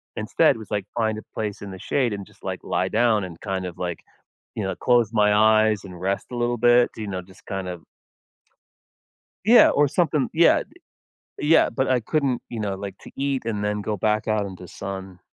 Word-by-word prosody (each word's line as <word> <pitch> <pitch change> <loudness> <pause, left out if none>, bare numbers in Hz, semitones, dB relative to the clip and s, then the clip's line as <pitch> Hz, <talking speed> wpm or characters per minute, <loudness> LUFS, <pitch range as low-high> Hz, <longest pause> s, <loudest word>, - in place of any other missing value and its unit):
instead - - +2
was, 110 - -11
like, 100 -2 -1
find 110 -2 0
a - - -6
place 105 -2 -4
in 100 - -7
the 95 - -9
shade 125 +2 0
and 100 -1 -5
just, - - -23
like, - - -4
lie - - 0
down 110 -2 +2
and 85 -3 -9
kind 95 -2 -3
of, 90 -2 -7
like, 90 -2 -3 0.6
you 110 - -2
know, 95 - -2
close 120 -3 +3
my 105 -2 +3
eyes 110 0 +4
and 90 -3 -10
rest 95 +2 -2
a - - -5
little 120 0 0
bit, 120 +1 +5
you 110 -1 -6
know, 95 -2 -3
just 95 +1 -19
kind 95 -2 -4
of 90 -3 -7 1.6
Yeah, 230 +3 +8
or 145 0 +3
something 150 -2 +1
Yeah, 165 +1 +5 0.8
yeah, 150 +3 +4
but 130 - -1
I 130 -1 +3
couldn't, 135 0 0
you 115 - -5
know, 100 -2 -2
like, 100 0 -7
to - - -13
eat 135 -3 -2
and 105 -3 -2
then 105 0 -1
go 105 +1 -2
back 105 +2 0
out 110 -2 +1
into 95 -2 -9
sun. 95 -1 -7
105 Hz, 205 wpm, -24 LUFS, 95-120 Hz, 1.6 s, Yeah